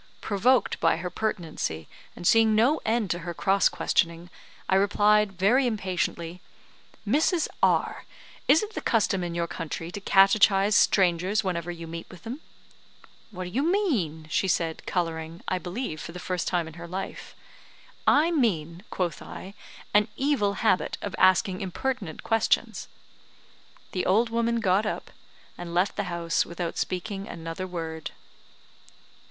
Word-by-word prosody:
Provoked 240 +5 +2
by - - +3
her 180 +1 -5
pertinacity, 165 - -3 0.3
and - - -9
seeing 220 +2 +5
no 250 +8 +3
end 220 -4 0
to 175 - -1
her 170 0 -6
cross 195 +2 +3
questioning, 170 +1 0 0.4
I - - +1
replied, 205 +1 +3
very 240 +8 +3
impatiently, 180 -5 -2 0.7
"Mrs. 310 - +2
R, - - +2 0.4
is 320 - +5
it 430 +1 -6
the - - -4
custom 200 -5 +1
in 170 -1 -4
your 170 0 0
country 165 0 -5
to 200 - -6
catechise 195 +1 +5
strangers 190 +3 +3
whenever 175 -3 -2
you 170 -1 -6
meet 165 +1 -7
with 185 - -13
them?" 250 +7 -6 0.9
"What 185 -4 -6
do 180 - -7
you 255 - 0
mean?" 275 - 0
she 190 - +1
said, 165 -2 -1
colouring, 165 -2 -3
I 185 - 0
believe, 180 -3 -5
for 165 - -8
the - - -7
first 180 -1 -3
time 175 -3 0
in 160 - -10
her 170 - -7
life. 185 +3 -6 0.7
"I 310 +4 +5
mean," 180 - 0
quoth 180 -3 -2
I, 195 - -9 0.4
"an 210 +1 +4
evil 260 -8 +1
habit 185 - +2
of 200 - -4
asking 185 0 +4
impertinent 195 - -3
questions." 225 -1 +1 1.0
The 180 - -2
old 225 +5 +3
woman 235 0 +1
got 200 +1 +2
up, - - -4 0.5
and 170 -1 -6
left 185 +3 +2
the 205 - -2
house 170 -1 0
without 170 0 -5
speaking 195 +2 -3
another 165 +2 -6
word. 160 -3 -5
185 Hz, 150 wpm, -26 LUFS, 170-220 Hz, 1.0 s, seeing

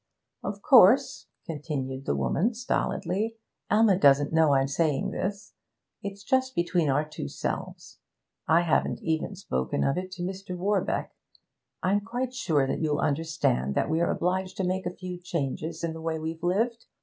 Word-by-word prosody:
'Of - - -5
course,' - - +6 0.2
continued 135 -4 -4
the - - +1
woman 165 - 0
stolidly, 220 -2 -1 0.3
'Alma 210 -3 +4
doesn't 140 -1 +5
know 160 -3 +5
I'm 135 0 +2
saying 150 0 0
this. 200 +2 -4 0.5
It's 200 0 -7
just 260 +3 +1
between 170 -2 +1
our 145 +3 +1
two 150 - -6
selves. - - -5 0.5
I 165 +2 +5
haven't 170 -3 0
even 160 +4 -1
spoken 65 - -2
of 135 - +1
it 185 0 -7
to 175 -2 -5
Mr. 185 0 -5
Warbeck. 200 +2 0 0.7
I'm 200 +3 +2
quite 245 +4 -3
sure 155 - +1
that 135 - -2
you'll 150 -2 +1
understand 145 - 0
that - - +1
we're 165 +2 +2
obliged 185 +1 -1
to 190 - -1
make 185 0 -1
a 180 - -5
few 180 -1 -6
changes 165 -2 -3
in 165 -1 -1
the 160 - -8
way 160 0 -2
we've 160 +1 -5
lived. 225 +7 0
170 Hz, 160 wpm, -27 LUFS, 150-195 Hz, 0.7 s, course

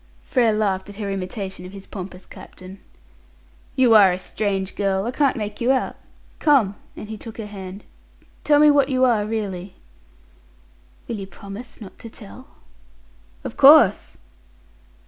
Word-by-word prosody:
Frere 240 -4 +2
laughed 205 -2 -1
at 205 - -10
her 200 -1 -4
imitation 190 -1 -5
of 185 +1 -10
his 195 -1 -10
pompous 185 -2 -9
captain. 185 +1 -13 1.0
"You 250 -3 +4
are 200 -4 +7
a 180 - -2
strange 195 0 -3
girl; 195 -1 0
I 240 - -2
can't 275 0 +1
make 210 0 -5
you 245 +2 +3
out. 260 -1 0 0.4
Come," 270 -10 +3 0.2
and - - -8
he 220 0 -7
took 225 -1 -10
her 220 - -5
hand, 195 -1 -9 0.6
"tell 295 -1 +4
me 300 0 +7
what 280 -1 +3
you 260 -1 +3
are 220 -4 +2
really." 195 -4 -4 1.3
"Will 230 - -4
you 195 -1 -7
promise 200 +5 -10
not 205 -4 -12
to 230 - -9
tell?" 220 +4 -12 1.0
"Of - - -7
course." - - +6
210 Hz, 155 wpm, -22 LUFS, 195-235 Hz, 1.3 s, are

